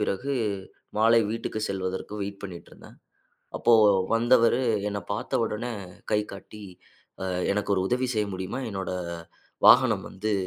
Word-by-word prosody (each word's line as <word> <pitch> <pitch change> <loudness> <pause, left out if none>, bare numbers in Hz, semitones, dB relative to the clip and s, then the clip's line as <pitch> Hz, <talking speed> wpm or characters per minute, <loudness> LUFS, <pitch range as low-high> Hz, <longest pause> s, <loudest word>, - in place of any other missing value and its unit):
பிறகு, 105 +7 -1 0.7
மாலை 115 +1 +5
வீட்டுக்கு 115 -1 -3
செல்வதற்கு 95 +1 -4
வெயிட் 100 0 -6
பண்ணிட்டுருந்தேன். 90 -4 -11 0.6
அப்போ 120 - +3 0.4
வந்தவரு 120 +1 +4 0.3
என்ன 100 0 -3
பாத்த 105 - -2
உடனே 115 +3 -3 0.4
கை 105 - +3
காட்டி, 100 +2 -11 0.6
அ - - -2 0.3
"எனக்கு 105 0 -2
ஒரு 95 - +1
உதவி 125 +1 +1
செய்ய 105 -1 +1
முடியுமா? 95 +8 -4
என்னோட 95 -2 -4 0.8
வாகனம் - - +6
வந்து 105 +3 -3
105 Hz, 125 wpm, -26 LUFS, 100-115 Hz, 0.8 s, வாகனம்